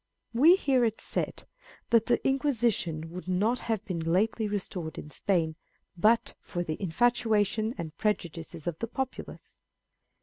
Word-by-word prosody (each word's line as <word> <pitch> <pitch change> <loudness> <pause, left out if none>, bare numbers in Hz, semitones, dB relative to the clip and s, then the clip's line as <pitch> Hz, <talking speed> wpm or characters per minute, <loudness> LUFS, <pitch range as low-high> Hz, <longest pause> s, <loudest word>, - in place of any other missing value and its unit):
We 305 +10 +7
hear 270 -8 +2
it 225 -2 0
said, - - -2 0.5
that 230 -1 +4
the 245 - +3
Inquisition 230 - 0
would 180 +1 -8
not 205 +7 +1
have 220 -2 -2
been 180 -5 -3
lately 200 +7 +1
restored 185 -5 -4
in 150 - -8
Spain 165 -4 0 0.4
but 215 +6 +3
for 175 -1 -4
the 155 +1 -4
infatuation 220 +2 +1
and 160 -2 -6
prejudices 170 -6 -2
of 170 -2 -3
the 230 - -2
populace. 265 +2 -6
210 Hz, 140 wpm, -29 LUFS, 170-235 Hz, 0.5 s, We